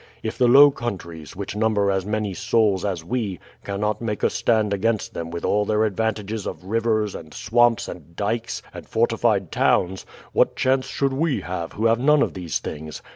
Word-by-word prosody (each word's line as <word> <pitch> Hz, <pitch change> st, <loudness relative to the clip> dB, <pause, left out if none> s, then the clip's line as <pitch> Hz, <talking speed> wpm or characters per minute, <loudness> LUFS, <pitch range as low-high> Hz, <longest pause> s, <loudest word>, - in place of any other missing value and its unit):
If 110 Hz, -, -3 dB
the 125 Hz, -, +3 dB
Low 140 Hz, +4 st, +8 dB
Countries, 85 Hz, -, -6 dB
which 100 Hz, +1 st, -5 dB
number 105 Hz, -2 st, +2 dB
as 95 Hz, 0 st, -1 dB
many 105 Hz, -2 st, -1 dB
souls 105 Hz, 0 st, +1 dB
as 95 Hz, -5 st, -2 dB
we, 110 Hz, -3 st, -2 dB, 0.3 s
cannot 105 Hz, +2 st, -2 dB
make 105 Hz, -3 st, -3 dB
a -, -, +3 dB
stand 110 Hz, -3 st, +1 dB
against 110 Hz, +2 st, -1 dB
them 85 Hz, -1 st, -5 dB
with 85 Hz, 0 st, -5 dB
all 105 Hz, 0 st, +2 dB
their 105 Hz, +1 st, +1 dB
advantages 110 Hz, 0 st, -2 dB
of -, -, -6 dB
rivers, 110 Hz, 0 st, 0 dB
and 80 Hz, -1 st, -9 dB
swamps, 120 Hz, 0 st, +2 dB
and 85 Hz, 0 st, -10 dB
dykes, 115 Hz, +4 st, -2 dB
and -, -, -10 dB
fortified -, -, +1 dB
towns, 95 Hz, +1 st, +1 dB, 0.3 s
what -, -, +3 dB
chance 130 Hz, 0 st, +1 dB
should 135 Hz, -1 st, -1 dB
we 150 Hz, +1 st, 0 dB
have 85 Hz, -2 st, -5 dB
who 110 Hz, -, -2 dB
have 115 Hz, 0 st, +4 dB
none 150 Hz, +3 st, +4 dB
of -, -, -2 dB
these 90 Hz, -5 st, -3 dB
things? 75 Hz, 0 st, -7 dB
105 Hz, 185 wpm, -23 LUFS, 95-115 Hz, 0.3 s, Low